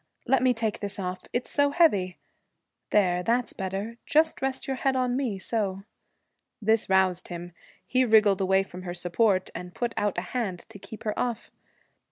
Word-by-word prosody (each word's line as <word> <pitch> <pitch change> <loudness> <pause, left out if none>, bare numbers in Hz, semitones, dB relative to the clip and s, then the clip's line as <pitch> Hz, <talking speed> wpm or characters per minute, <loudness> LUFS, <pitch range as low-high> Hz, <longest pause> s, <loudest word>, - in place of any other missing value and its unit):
Let 265 0 +3
me 255 0 +4
take 220 -2 -2
this 205 -1 -3
off 185 -1 -4
it's 245 - -2
so 285 0 +3
heavy. 205 - +3 0.7
There, 180 -4 +3
that's 235 +5 0
better. 195 +5 -4
Just 320 -2 +2
rest 270 0 -2
your 265 -1 -2
head 270 0 +1
on 250 -1 +1
me, 250 -7 -1
so.' 195 -1 -2 0.8
This 220 -1 +2
roused 185 -2 +2
him. 175 0 -7 0.3
He 255 0 +2
wriggled 215 -4 +4
away 190 0 +3
from 185 -1 -10
her 175 -1 -5
support, 185 +2 +1
and 180 +1 -8
put 240 -2 -2
out 205 -3 0
a - - +1
hand 205 -8 -2
to 215 -2 -12
keep 220 +2 -10
her 215 - -1
off. 240 -2 -2
210 Hz, 180 wpm, -27 LUFS, 185-245 Hz, 0.8 s, me